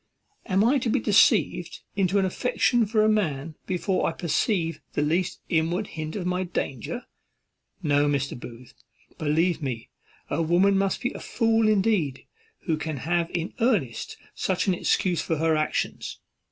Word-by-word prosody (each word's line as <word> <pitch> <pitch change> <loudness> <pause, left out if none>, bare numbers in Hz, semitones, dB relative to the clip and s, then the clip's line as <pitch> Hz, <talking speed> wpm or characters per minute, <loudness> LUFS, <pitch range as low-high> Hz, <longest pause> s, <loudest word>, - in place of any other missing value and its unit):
am 190 +2 +3
I 265 +5 +4
to 235 - -1
be - - +2
deceived - - +3
into 195 0 +2
an 195 - +3
affection 240 +3 +1
for 215 0 +2
a - - +4
man 160 -8 0
before 185 0 0
I - - -5
perceive 165 -1 0
the 145 - +1
least 175 +4 0
inward 170 +5 +1
hint 155 0 -5
of 190 -4 -3
my 180 +1 0
danger? 140 -9 -4 0.8
No, 145 -1 +3
Mr. 140 -1 0
Booth, 120 0 -11 0.5
believe 160 +3 +1
me, 125 -5 -4 0.4
a - - -1
woman 175 +5 +3
must 195 0 +1
be 250 - -1
a - - -7
fool 225 -2 +2
indeed 195 -10 +1 0.4
who 160 -4 -1
can 155 -1 -4
have 170 +5 0
in 170 +1 -2
earnest 205 - 0 0.2
such 190 -2 -1
an 190 - +2
excuse 180 0 +1
for 160 - -1
her 160 +1 +2
actions. 155 0 -2
175 Hz, 160 wpm, -26 LUFS, 155-200 Hz, 0.8 s, I